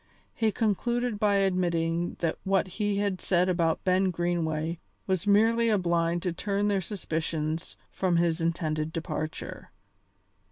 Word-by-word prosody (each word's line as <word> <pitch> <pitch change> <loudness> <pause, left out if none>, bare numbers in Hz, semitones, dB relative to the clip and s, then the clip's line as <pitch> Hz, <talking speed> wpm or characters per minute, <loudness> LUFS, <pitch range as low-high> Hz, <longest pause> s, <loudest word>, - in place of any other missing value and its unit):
He 220 -2 +1
concluded 235 +2 0
by 205 -1 +3
admitting 175 -3 +1
that 165 -2 -1
what 195 -1 +2
he 205 +2 -1
had 200 -2 -1
said 180 -1 +2
about 170 -3 +1
Ben 185 +1 +3
Greenway 165 -2 -1 0.3
was 190 0 -1
merely 225 +3 +4
a 215 - +3
blind 170 -1 0
to 180 -3 -1
turn 200 +3 0
their 200 -2 +1
suspicions 160 -4 -3
from 185 -2 0
his 170 0 +1
intended 160 -2 -1
departure. 160 -1 -5
180 Hz, 135 wpm, -28 LUFS, 165-200 Hz, 0.3 s, merely